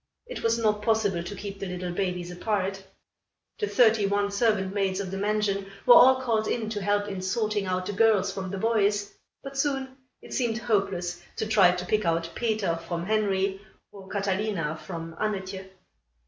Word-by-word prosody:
It - - -7
was 230 0 +2
not 210 -2 +1
possible 210 -5 +1
to 190 +4 -6
keep 200 0 -7
the 195 - -4
little 180 0 -4
babies 180 -1 -2
apart. 195 0 -2 0.8
The 420 - 0
thirty 225 - +4
one 200 0 0
servant 200 -3 +1
maids 195 -2 0
of 190 -2 -4
the 195 - -3
mansion 200 -1 0 0.2
were 245 - +9
all 260 +1 +8
called 225 -4 0
in 220 -2 -2
to 205 -2 -3
help 205 +1 +1
in 195 -2 -4
sorting 210 +1 -1
out 185 0 -1
the 205 - -3
girls 210 -1 +3
from 190 -1 -5
the 195 - -4
boys; 205 -1 +1 0.3
but 275 0 -6
soon 270 -2 -1 0.2
it - - -11
seemed 235 -3 0
hopeless 190 -6 -1
to - - -2
try 195 -5 +5
to 180 0 -4
pick 215 +3 +1
out 165 -1 0
Peter 215 -7 0
from 170 +1 -4
Henry, 195 -2 0 0.3
or 195 -2 -12
Catalina 195 -5 -1
from 165 -1 -7
Annetje. 190 -2 -3
200 Hz, 180 wpm, -27 LUFS, 190-220 Hz, 0.8 s, were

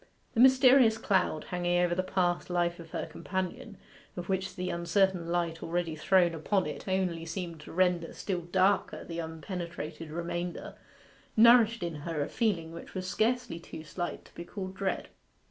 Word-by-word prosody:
The - - -1
mysterious 255 -2 +7
cloud 190 -7 +1
hanging 175 0 0
over 175 -1 +2
the 180 - +1
past 180 -2 0
life 175 -1 0
of 165 -1 -10
her - - -3
companion, 185 +5 -5 0.4
of 175 +1 -5
which 190 -1 -1
the 180 0 -2
uncertain 170 +1 +1
light 170 -1 -1
already 165 -1 -2
thrown 175 +2 +3
upon 185 +4 0
it 150 - -6
only 185 -3 0
seemed 170 -1 -5
to - - -11
render 180 -1 +1
still 185 -3 -3
darker 185 +3 +1
the 170 0 -5
unpenetrated 165 -1 -6
remainder, 175 +2 -4 0.6
nourished 230 -2 +6
in 170 -3 -3
her 150 0 -2
a - - -5
feeling 180 -8 0
which 170 +4 -10
was 185 0 -3
scarcely 225 -2 0
too 160 -1 -9
slight 175 +2 -5
to - - -19
be 170 - -7
called 185 +1 -6
dread. 190 -1 -2
175 Hz, 165 wpm, -30 LUFS, 170-190 Hz, 0.6 s, mysterious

